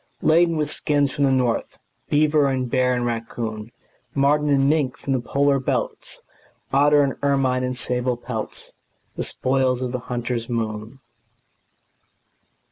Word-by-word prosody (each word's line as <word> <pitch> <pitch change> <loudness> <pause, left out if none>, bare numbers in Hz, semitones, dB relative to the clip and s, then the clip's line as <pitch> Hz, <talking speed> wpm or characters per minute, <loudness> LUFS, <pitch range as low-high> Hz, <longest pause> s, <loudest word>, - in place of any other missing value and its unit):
Laden 165 +1 +4
with 150 -1 -1
skins 145 -2 0
from 140 - +1
the 135 - +3
north, 125 -3 0 0.3
Beaver 150 -1 +3
and 130 -2 -1
bear 125 0 +2
and 120 0 -1
raccoon, 115 -1 -4 0.4
Marten 145 +2 +2
and 135 -1 +3
mink 145 -4 +1
from 135 - -2
the 130 - 0
polar 140 +2 +2
belts, 130 - -3 0.5
Otter 145 +1 +5
and 140 - 0
ermine 135 -2 +1
and 125 0 -2
sable 125 0 -1
pelts 115 -3 -6 0.4
The - - -2
spoils 130 -1 0
of 125 - -3
the 125 - -2
hunter's 120 -1 -3
moon. 115 +2 -4
130 Hz, 140 wpm, -22 LUFS, 120-140 Hz, 0.5 s, Otter